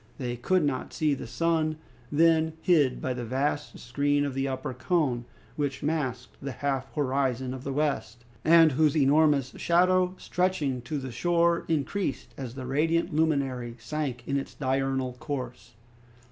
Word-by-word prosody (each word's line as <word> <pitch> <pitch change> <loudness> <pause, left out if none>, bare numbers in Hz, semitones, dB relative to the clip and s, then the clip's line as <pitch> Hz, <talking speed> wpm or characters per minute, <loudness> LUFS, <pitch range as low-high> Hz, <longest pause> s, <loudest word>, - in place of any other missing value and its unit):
They 120 -2 -3
could 180 +9 +1
not 135 -3 -2
see 155 -2 +1
the 135 - -5
sun, 160 +3 0 0.3
then 160 +1 +4
hid 150 -8 +3
by 130 - 0
the 125 -1 -5
vast 140 +5 -2
screen 145 +3 0
of 140 - -3
the 135 +1 -1
upper 130 -1 -3
cone, 130 -4 0 0.3
which 145 -2 -2
masked 135 -5 -2
the 140 -1 -4
half 135 0 -2
horizon 130 -3 0
of 130 -1 -7
the 140 - -3
west, 135 -4 -2 0.2
and 165 -1 +7
whose 150 +2 +2
enormous 145 -2 +3
shadow 185 +1 +3
stretching 160 -9 -1
to 150 - -1
the 130 -2 -5
shore 170 +6 +2
increased 160 +1 -2
as 130 -3 -7
the 130 -1 -6
radiant 165 +6 +1
luminary 135 -6 0
sank 130 0 -4
in 140 - +1
its 135 - -5
diurnal 135 -1 -1
course. 125 -5 -6
140 Hz, 155 wpm, -27 LUFS, 130-160 Hz, 0.3 s, and